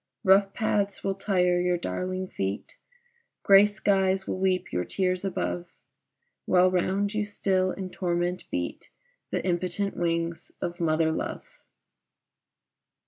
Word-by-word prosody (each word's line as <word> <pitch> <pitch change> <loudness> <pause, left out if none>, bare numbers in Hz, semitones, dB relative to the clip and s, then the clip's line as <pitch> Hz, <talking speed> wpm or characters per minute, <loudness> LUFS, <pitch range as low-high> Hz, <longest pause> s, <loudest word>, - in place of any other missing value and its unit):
Rough 195 0 +5
paths 205 -2 -1
will 195 - 0
tire 180 -3 +1
your 180 0 +1
darling 185 - -3
feet, 95 - -4 0.7
Gray 200 +1 +7
skies 195 -2 +1
will - - -3
weep 185 -1 0
your 90 - 0
tears 185 - -1
above, 90 - -2 0.8
While 185 0 +5
round 195 +3 0
you 210 0 0
still, 190 -2 0
in 185 0 -5
torment, 175 0 -2
beat 90 0 -4 0.4
The - - -2
impotent 185 +2 -1
wings 170 -1 -2
of 175 0 -4
mother 160 -1 +2
love. - - -5
185 Hz, 125 wpm, -27 LUFS, 175-195 Hz, 0.8 s, Gray